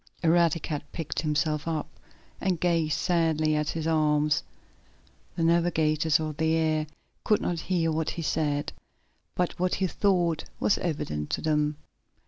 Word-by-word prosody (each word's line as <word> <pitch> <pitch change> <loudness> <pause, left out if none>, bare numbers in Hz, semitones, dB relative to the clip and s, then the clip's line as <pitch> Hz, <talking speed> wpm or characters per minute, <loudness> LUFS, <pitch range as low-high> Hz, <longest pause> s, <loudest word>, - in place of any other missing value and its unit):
Eradicate 165 -3 +2
picked 165 -3 -3
himself 150 0 0
up, 160 -2 -2 0.5
and 185 -3 0
gazed 165 -4 +1
sadly 160 -3 +1
at 150 0 0
his 160 -1 -3
arms. 150 -2 +2 0.9
The 165 - -1
navigators 160 -2 +2
of 155 -2 -4
the 160 0 +2
air 155 -1 +1 0.4
could 210 - +3
not 175 -2 -2
hear 165 -2 0
what 160 0 -1
he 170 - -4
said, 150 -2 -1 0.6
but 180 0 -1
what 180 0 +1
he 190 - 0
thought 175 -4 +1
was 205 - +2
evident 75 - -3
to - - -2
them. 150 -1 +1
160 Hz, 140 wpm, -27 LUFS, 150-170 Hz, 0.9 s, could